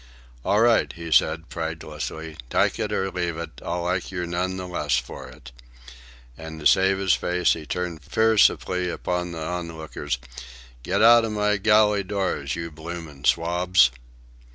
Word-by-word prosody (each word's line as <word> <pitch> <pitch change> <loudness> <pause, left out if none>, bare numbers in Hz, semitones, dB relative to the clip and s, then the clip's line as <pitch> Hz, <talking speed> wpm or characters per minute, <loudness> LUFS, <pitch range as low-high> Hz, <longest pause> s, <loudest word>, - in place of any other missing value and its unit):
"All 105 +2 +2
right," 115 -1 +3
he 85 -1 -8
said 80 +1 +3
pridelessly, 80 -1 -5
"tyke - - +1
it - - -2
or 95 0 -1
leave 85 -2 -2
it, 80 -5 -8
I'll 85 +1 -3
like 90 +1 -1
yer 90 -2 -3
none 90 +2 -2
the 95 -1 -5
less 75 -5 0
for - - -6
it." 65 - -13 0.8
And 80 +1 -9
to 75 - -10
save 95 +3 +4
his 95 -2 +2
face 90 0 +1
he 80 -2 -8
turned 90 -2 -3
fiercely 100 - +2
upon 90 0 -3
the 80 -2 -5
onlookers. 80 -5 -4 0.6
"Get 95 - 0
outa 115 0 +7
my 105 -1 +1
galley 105 0 +4
doors, 95 -8 -2
you 85 0 -5
bloomin' 80 -3 -8
swabs!" 85 -4 +3
90 Hz, 155 wpm, -24 LUFS, 80-95 Hz, 0.8 s, outa